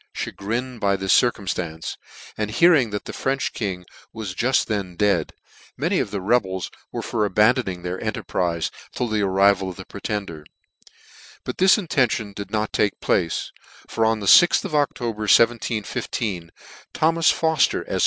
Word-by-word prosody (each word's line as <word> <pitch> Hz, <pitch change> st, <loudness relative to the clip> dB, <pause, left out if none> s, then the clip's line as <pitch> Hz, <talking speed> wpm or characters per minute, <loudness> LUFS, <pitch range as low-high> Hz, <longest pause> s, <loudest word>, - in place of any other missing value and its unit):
Chagrined 120 Hz, +4 st, -4 dB
by 100 Hz, -1 st, +2 dB
this 95 Hz, 0 st, +1 dB
circumftance, 90 Hz, -8 st, 0 dB, 0.4 s
and 105 Hz, -1 st, -2 dB
hearing 145 Hz, 0 st, +4 dB
that 105 Hz, 0 st, -5 dB
the -, -, -7 dB
French 135 Hz, 0 st, -2 dB
King 95 Hz, -4 st, -4 dB, 0.3 s
was 110 Hz, -4 st, -6 dB
juit 125 Hz, +7 st, +1 dB
then 100 Hz, -5 st, -3 dB
dead, 100 Hz, -5 st, +1 dB, 0.5 s
many -, -, 0 dB
of -, -, -1 dB
tke 100 Hz, -2 st, -5 dB
rebels 95 Hz, -5 st, 0 dB, 0.2 s
were -, -, -4 dB
for 110 Hz, -2 st, -1 dB
abandoning 105 Hz, -2 st, +2 dB
their 90 Hz, +1 st, -4 dB
enterprize 90 Hz, -6 st, -2 dB, 0.2 s
till 125 Hz, -, -2 dB
the 110 Hz, -2 st, 0 dB
arrival 95 Hz, 0 st, +3 dB
of 90 Hz, -, -8 dB
the 95 Hz, -, -10 dB
Pretender: 100 Hz, -6 st, -5 dB, 1.0 s
but -, -, -6 dB
this 190 Hz, +1 st, +6 dB
intention 130 Hz, -, 0 dB
did' 100 Hz, 0 st, -7 dB
not 110 Hz, -1 st, -2 dB
take 105 Hz, -, 0 dB
place: 85 Hz, -3 st, 0 dB, 0.4 s
for 115 Hz, -, -1 dB
on 110 Hz, -1 st, +1 dB
the -, -, -4 dB
6th 175 Hz, -, +6 dB
of -, -, -6 dB
October 120 Hz, -7 st, -1 dB
1715, 110 Hz, -5 st, +1 dB, 0.5 s
Thomas 165 Hz, +1 st, +3 dB
Fofter, 160 Hz, -3 st, +1 dB
Efq -, -, -2 dB
105 Hz, 155 wpm, -22 LUFS, 95-120 Hz, 1.0 s, this